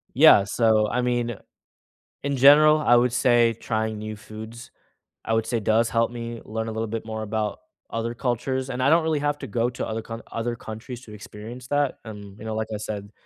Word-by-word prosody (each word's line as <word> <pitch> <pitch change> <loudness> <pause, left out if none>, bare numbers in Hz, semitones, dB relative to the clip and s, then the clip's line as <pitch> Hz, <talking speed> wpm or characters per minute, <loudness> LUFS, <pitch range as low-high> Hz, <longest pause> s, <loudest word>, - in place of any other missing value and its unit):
Yeah, 100 - +7
so, 110 0 +2
I 125 - 0
mean, 120 -2 -1 0.9
in 140 -1 -1
general, 150 +3 +7
I 120 -5 +4
would 120 0 +3
say 120 -1 +3
trying 110 -1 -2
new 110 0 -6
foods, 110 +3 -10 0.5
I 115 - -1
would 115 0 +1
say 115 -2 -1
does 110 +2 +2
help 115 0 +1
me 115 -1 -6
learn 110 +1 -4
a 110 - -4
little 110 0 -2
bit 115 0 -4
more 110 -1 -4
about 110 - -2 0.3
other 115 +1 -3
cultures, 130 +2 -2
and 130 0 -2
I 140 - +4
don't 165 0 +5
really 160 -2 0
have 145 0 0
to - - -6
go 115 +3 0
to 125 - -5
other 110 0 -3
count 115 +1 -8
other 120 +1 -3
countries 115 +3 -8
to 105 - -12
experience 110 +4 -10
that, 145 -1 0
and, 105 -2 -10
you 110 - -11
know, 110 0 -4
like 110 0 -2
I - - -2
said, 105 -1 -6
115 Hz, 215 wpm, -24 LUFS, 110-125 Hz, 0.9 s, Yeah